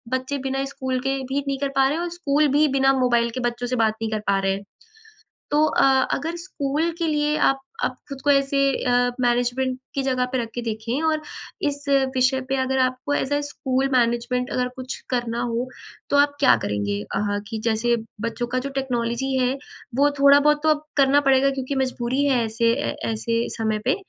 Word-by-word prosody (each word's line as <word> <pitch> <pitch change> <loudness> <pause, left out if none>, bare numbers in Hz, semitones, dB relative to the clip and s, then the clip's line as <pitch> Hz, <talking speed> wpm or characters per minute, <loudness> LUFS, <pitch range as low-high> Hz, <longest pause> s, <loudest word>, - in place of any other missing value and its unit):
बच्चे 260 +2 -3
बिना 270 0 -1
स्कूल 260 -2 -3
के 270 0 +1
भी 270 +2 -2
नहीं 275 0 -1
कर 280 0 -1
पा 270 0 +4
रहे 295 - -1
हैं 340 - -2
और 350 - -3
स्कूल 300 -2 +2
भी 305 +1 +5
बिना 270 0 +4
मोबाइल 240 -2 +2
के - - -2
बच्चों 240 +1 -6
से 255 - -1
बात 225 -3 +2
नहीं 225 -1 -2
कर 215 - -1
पा 195 0 +3
रहे 195 0 +1
हैं। 195 +1 -5 0.9
तो 300 +1 +4
अ, - - +1 0.3
अगर 325 +4 -2
स्कूल 320 -2 -2
के 335 - 0
लिए 300 0 +1
आप 270 0 +3 0.2
आप - - -1
खुद 275 -2 -7
को 290 - +4
ऐसे 275 0 +2 0.3
अ, 245 0 +3
मैनेजमेंट 245 +1 +1 0.2
की 275 - 0
जगह 255 -1 0
पर 260 - +1
रख 230 - -4
के 240 - -3
देखें, 230 +5 -3
और 315 -1 +1 0.5
इस 285 0 -5 0.3
विषय 260 +1 +3
पे 270 - 0
अगर 265 0 0
आपको 255 +3 0
एज़ 280 0 -1
अ, 290 - +1
स्कूल 270 -2 -1
मैनेजमेंट 250 +1 +1
अगर 250 0 0
कुछ 255 0 -5
करना 240 -2 -1
हो 240 +1 -1 0.4
तो - - +3
आप 285 0 +3
क्या 280 - +6
करेंगे? 100 0 -2 0.2
अह, 205 0 0
कि 220 -1 -4
जैसे 235 +1 +2 0.2
बच्चों 230 +1 -2
का - - +2
जो - - -4
टेक्नोलॉजी 250 0 -1
है 255 0 +2 0.5
वो 290 +1 +5
थोड़ा 280 0 +8
बहुत 300 +1 +3
तो - - +3
अब 305 -1 +2
करना 275 +1 +5
पड़ेगा 270 +1 +4
क्योंकि 270 0 -3
मजबूरी 255 +2 -1
है 255 -4 +2
ऐसे 230 +1 +1
ए 280 +5 -2 0.2
ऐसे 230 +1 -1
समय 220 -2 0
पे। 260 - +3
260 Hz, 210 wpm, -23 LUFS, 240-280 Hz, 0.9 s, थोड़ा